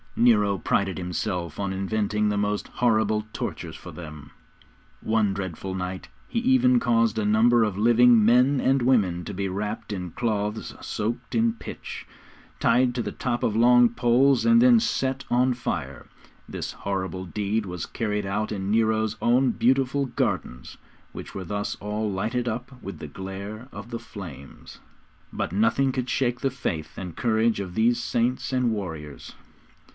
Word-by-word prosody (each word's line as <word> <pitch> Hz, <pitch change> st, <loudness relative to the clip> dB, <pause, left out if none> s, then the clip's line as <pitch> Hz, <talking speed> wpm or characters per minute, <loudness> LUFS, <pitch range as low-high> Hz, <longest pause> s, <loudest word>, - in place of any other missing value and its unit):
Nero 105 Hz, -4 st, +4 dB
prided 95 Hz, 0 st, 0 dB
himself 90 Hz, -2 st, -3 dB
on 100 Hz, -1 st, -1 dB
inventing 105 Hz, +2 st, 0 dB
the 105 Hz, -, 0 dB
most 105 Hz, 0 st, -1 dB
horrible 110 Hz, -3 st, +1 dB
tortures -, -, -5 dB
for -, -, -10 dB
them. 75 Hz, -4 st, -10 dB, 0.7 s
On -, -, -8 dB
one 110 Hz, -3 st, +2 dB
dreadful 95 Hz, -1 st, -5 dB
night 90 Hz, 0 st, -5 dB, 0.2 s
he 230 Hz, -, -1 dB
even 255 Hz, 0 st, +4 dB
caused 115 Hz, -, +2 dB
a 110 Hz, -, 0 dB
number 115 Hz, +3 st, +4 dB
of 105 Hz, -3 st, -1 dB
living 120 Hz, 0 st, +5 dB
men 125 Hz, +4 st, +4 dB
and 135 Hz, +1 st, +2 dB
women 100 Hz, -9 st, +2 dB
to 105 Hz, -, -5 dB
be 100 Hz, +1 st, -2 dB
wrapped 105 Hz, +3 st, -4 dB
in 90 Hz, -2 st, -4 dB
cloths 110 Hz, -1 st, -2 dB
soaked 110 Hz, +4 st, -3 dB
in 115 Hz, 0 st, +3 dB
pitch, 115 Hz, -, -8 dB, 0.5 s
tied 125 Hz, +1 st, +3 dB
to 125 Hz, -, 0 dB
the -, -, -5 dB
top 120 Hz, -2 st, -2 dB
of 110 Hz, -, 0 dB
long 120 Hz, +1 st, +6 dB
poles, 125 Hz, +3 st, +3 dB
and 235 Hz, 0 st, +5 dB
then 245 Hz, -2 st, +7 dB
set 135 Hz, -, -1 dB
on 125 Hz, +1 st, +3 dB
fire. 80 Hz, -, -4 dB, 0.4 s
This -, -, -5 dB
horrible 95 Hz, -1 st, -4 dB
deed 105 Hz, +4 st, -2 dB
was 90 Hz, -2 st, -5 dB
carried 105 Hz, -2 st, -2 dB
out 105 Hz, +2 st, -2 dB
in 100 Hz, -2 st, -3 dB
Nero's 110 Hz, -1 st, +2 dB
own 125 Hz, +2 st, +3 dB
beautiful 135 Hz, +3 st, +1 dB
gardens, 65 Hz, -, -3 dB, 0.4 s
which -, -, -8 dB
were 95 Hz, -1 st, -5 dB
thus 100 Hz, +3 st, -3 dB
all 105 Hz, +1 st, -3 dB
lighted 115 Hz, +6 st, -2 dB
up 125 Hz, +3 st, -5 dB
with 95 Hz, -5 st, -7 dB
the -, -, -6 dB
glare 100 Hz, -, -7 dB
of 100 Hz, +4 st, -9 dB
the 115 Hz, -, -3 dB
flames. 80 Hz, -9 st, -11 dB, 0.5 s
But -, -, -3 dB
nothing 130 Hz, +6 st, +2 dB
could 125 Hz, -1 st, -3 dB
shake 120 Hz, -2 st, 0 dB
the 135 Hz, -, 0 dB
faith 85 Hz, -, -4 dB
and 90 Hz, -3 st, -6 dB
courage 110 Hz, -1 st, +1 dB
of 90 Hz, -3 st, -5 dB
these 120 Hz, +2 st, +2 dB
saints 120 Hz, +4 st, -1 dB
and 125 Hz, -2 st, +1 dB
warriors. 80 Hz, -9 st, -6 dB
110 Hz, 160 wpm, -25 LUFS, 95-120 Hz, 0.7 s, then